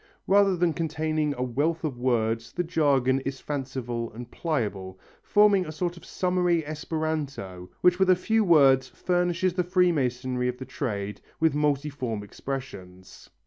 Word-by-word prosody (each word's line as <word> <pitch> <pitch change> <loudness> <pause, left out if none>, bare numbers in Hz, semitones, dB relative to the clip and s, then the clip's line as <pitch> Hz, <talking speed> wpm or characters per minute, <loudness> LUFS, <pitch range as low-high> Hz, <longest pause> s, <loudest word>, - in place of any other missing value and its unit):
Rather 195 -1 +4
than 170 -1 +2
containing 155 -1 -1
a 125 - -2
wealth 145 +8 -1
of 140 -6 -3
words 115 -2 0
the 180 - -1
jargon 140 -6 +2
is 135 0 -5
fanciful 125 -5 -4
and 120 +1 -9
pliable, 100 - -3 0.2
forming 205 -2 +4
a 155 - -6
sort 175 +3 -3
of 170 - -14
summary 180 -3 0
esperanto 150 - -4
which 180 0 +4
with 190 -1 +3
a 185 - +7
few 220 +5 +1
words 135 -7 +5
furnish 175 +5 -1
the 180 0 0
freemasonry 130 -9 +1
of 125 0 -2
the 130 - -7
trade 105 -6 -4 0.2
with 160 -3 +3
multiform 140 -6 -1
expressions. 100 -6 -8
145 Hz, 145 wpm, -26 LUFS, 125-170 Hz, 0.2 s, a